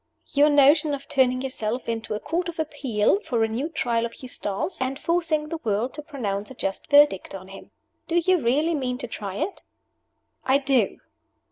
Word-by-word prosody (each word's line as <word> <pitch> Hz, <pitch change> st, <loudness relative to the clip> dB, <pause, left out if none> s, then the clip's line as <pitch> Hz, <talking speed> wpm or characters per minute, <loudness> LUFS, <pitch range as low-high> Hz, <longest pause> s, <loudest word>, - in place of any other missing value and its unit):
"Your 290 Hz, +1 st, +5 dB
notion 290 Hz, +1 st, +5 dB
of 280 Hz, 0 st, -11 dB
turning 255 Hz, -1 st, +2 dB
yourself 245 Hz, -2 st, -3 dB
into 225 Hz, -2 st, -3 dB
a -, -, -3 dB
Court 340 Hz, +6 st, -2 dB
of 335 Hz, -, -8 dB
Appeal 290 Hz, -, +1 dB
for 240 Hz, -, 0 dB
a -, -, +2 dB
new 245 Hz, +8 st, -3 dB
Trial 240 Hz, -7 st, 0 dB
of 235 Hz, -, -4 dB
Eustace, 255 Hz, -, -3 dB
and 260 Hz, +1 st, -1 dB
forcing 325 Hz, -2 st, 0 dB
the 330 Hz, -, -4 dB
world 220 Hz, +4 st, 0 dB
to 300 Hz, -, -6 dB
pronounce 210 Hz, -10 st, -4 dB
a 260 Hz, -, -10 dB
just 195 Hz, -5 st, -4 dB
verdict 290 Hz, -11 st, +4 dB
on 190 Hz, 0 st, -9 dB
him. 195 Hz, -, -11 dB, 0.4 s
Do 335 Hz, -, -2 dB
you 345 Hz, 0 st, +3 dB
really 290 Hz, +8 st, +2 dB
mean 255 Hz, -4 st, -1 dB
to 245 Hz, -, -5 dB
try 200 Hz, -4 st, -6 dB
it?" 375 Hz, -, -3 dB, 0.8 s
"I 265 Hz, +1 st, +4 dB
do!" 270 Hz, -6 st, +1 dB
265 Hz, 190 wpm, -25 LUFS, 225-300 Hz, 0.8 s, Your